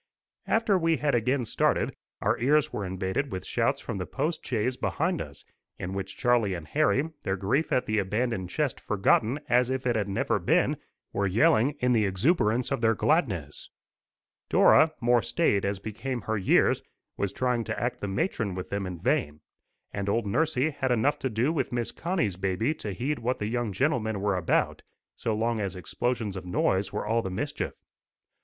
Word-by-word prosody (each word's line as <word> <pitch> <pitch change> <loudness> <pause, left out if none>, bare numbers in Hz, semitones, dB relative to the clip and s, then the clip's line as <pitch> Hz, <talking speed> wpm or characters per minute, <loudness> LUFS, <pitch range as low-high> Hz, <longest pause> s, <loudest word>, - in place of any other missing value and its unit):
After 220 -4 +2
we 165 -1 +2
had 145 -1 0
again 125 +2 +1
started, - - +1 0.3
our - - +1
ears 145 +5 +2
were 105 - -2
invaded 95 +8 -2
with 95 - -5
shouts - - 0
from 95 - -5
the 90 - -4
post 155 +4 -2
chaise 125 +1 -1
behind 165 +6 -1
us, 70 -1 -9 0.3
in 90 +1 -5
which 95 0 -5
Charlie 120 -6 +2
and 80 -3 -8
Harry, 155 - +1
their 95 - -1
grief 120 - 0
at 125 - +2
the 110 0 +1
abandoned 105 -1 -1
chest 145 +3 -1
forgotten 110 +6 +2
as 125 +1 +3
if 130 0 -2
it 120 -2 +2
had 105 -2 -1
never 95 - 0
been, - - +2 0.4
were 100 0 +1
yelling 115 +7 +3
in 125 0 +3
the 110 -3 +3
exuberance 115 - +1
of - - -1
their 115 -1 +3
gladness. 100 - 0 0.8
Dora, 155 0 +6
more 120 0 +4
staid 105 - +1
as 100 0 -1
became 115 +5 -4
her 110 - -2
years, 100 -3 +3 0.3
was 100 -1 -1
trying 125 +1 0
to - - -3
act 120 +1 -2
the 100 - -2
matron 100 - -1
with 90 - -6
them 100 -1 -2
in 90 -2 -6
vain, 105 - 0 0.5
and 100 0 -2
old 115 +2 +1
nursie 150 +5 +1
had 135 -3 -1
enough 125 +5 +2
to 130 - -1
do 120 +7 +1
with 160 - -1
Miss 120 -1 -1
Connie's 165 - -1
baby 95 +9 0
to 105 -9 -6
heed 130 +10 -2
what 125 +2 -1
the 105 - -3
young 120 0 -1
gentlemen 110 -2 0
were 100 0 +1
about, 90 -2 0 0.3
so 110 - -2
long 115 +1 0
as 100 -3 -2
explosions 110 +2 -2
of 95 - -5
noise 95 +2 0
was - - -3
all 115 +2 +2
the 95 - -4
mischief. 90 - -3
115 Hz, 190 wpm, -27 LUFS, 100-130 Hz, 0.8 s, Dora